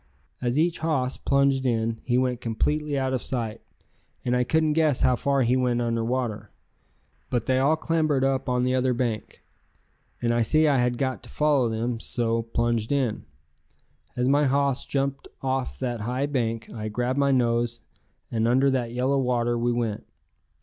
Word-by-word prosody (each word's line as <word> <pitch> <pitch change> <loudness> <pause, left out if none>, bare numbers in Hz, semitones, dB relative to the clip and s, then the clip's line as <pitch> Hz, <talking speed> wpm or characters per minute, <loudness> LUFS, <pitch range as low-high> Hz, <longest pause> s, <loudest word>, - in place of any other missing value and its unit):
As 125 +1 0
each 165 +2 +1
hoss 140 -6 0
plunged 140 -1 +2
in 115 -2 0
he 125 -1 +1
went 125 -2 0
completely 150 +6 -1
out 130 -1 0
of 130 - -1
sight, 115 -3 -3 0.6
and 125 0 +1
I 125 - +2
couldn't 160 +2 +2
guess 155 -4 +2
how 125 - +4
far 140 +1 +1
he 125 +2 +2
went 125 -2 +1
under 115 -1 0
water. 120 -2 -2 0.8
But 120 -3 -1
they 130 0 +2
all 140 +4 +3
clambered 155 -4 +1
up 135 -1 0
on 125 0 +1
the 130 0 +1
other 130 -1 +1
bank, 120 -3 -3 0.8
and 120 -1 +1
I 120 - +2
see 155 +7 +3
I 140 -3 +3
had 120 0 +1
got 130 -1 -2
to - - -15
follow 145 -5 +2
them, 115 +1 -2
so 115 -1 -1
plunged 115 0 -1
in. 130 -6 0 0.9
As 125 0 0
my 145 +2 +4
hoss 140 0 +1
jumped 135 0 -2 0.2
off 130 -1 -1
that 120 -4 -3
high 125 +5 -1
bank, 115 -5 -2
I 110 -1 -4
grabbed 125 +5 -1
my 140 0 +3
nose 120 -2 +1 0.5
and 115 -1 +1
under 130 +3 +3
that 120 -3 -1
yellow 130 +3 +1
water 120 -2 +1
we 120 +1 0
went. 115 -3 -2
125 Hz, 175 wpm, -25 LUFS, 120-135 Hz, 0.9 s, how